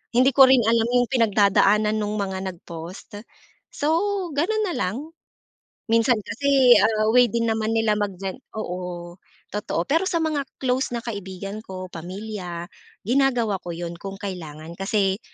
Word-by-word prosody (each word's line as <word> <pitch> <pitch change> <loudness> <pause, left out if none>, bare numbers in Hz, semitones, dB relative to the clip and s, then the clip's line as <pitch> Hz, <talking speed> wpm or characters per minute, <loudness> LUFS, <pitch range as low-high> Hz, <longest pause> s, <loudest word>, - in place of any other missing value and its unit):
hindi 255 +3 +5
ko 270 -1 +8
rin 260 -3 +5
alam 230 0 +3
yung 245 0 +3
pinagdadaanan 210 -2 +3
nung 210 0 -2
mga 190 -1 -3
nag-post. 175 +4 -9 0.5
So, 295 +1 -1 0.4
gano'n 430 +9 +1
na - - -3
lang. 185 +6 -1 0.9
Minsan 230 +2 +4
kasi, 265 +2 +4
ah, 215 +1 +2
way 245 0 +6
din 230 -1 0
naman 220 0 0
nila 225 -1 +2
mag 205 -2 -1
gen 190 +5 -5 0.2
oo, 180 -3 -5 0.4
totoo, 205 -4 -2
pero 330 +6 +1
sa 350 - -1
mga 310 -2 0 0.2
close 260 0 -1
na 235 - -5
kaibigan 200 -1 -6
ko, 185 -3 -8
pamilya, 180 0 -6 0.4
ginagawa 240 -4 +1
ko - - -10
'yon 170 0 -5
kung 195 0 -6
kailangan, 165 -5 -7
kasi 195 -1 +1
210 Hz, 150 wpm, -23 LUFS, 190-245 Hz, 0.9 s, ko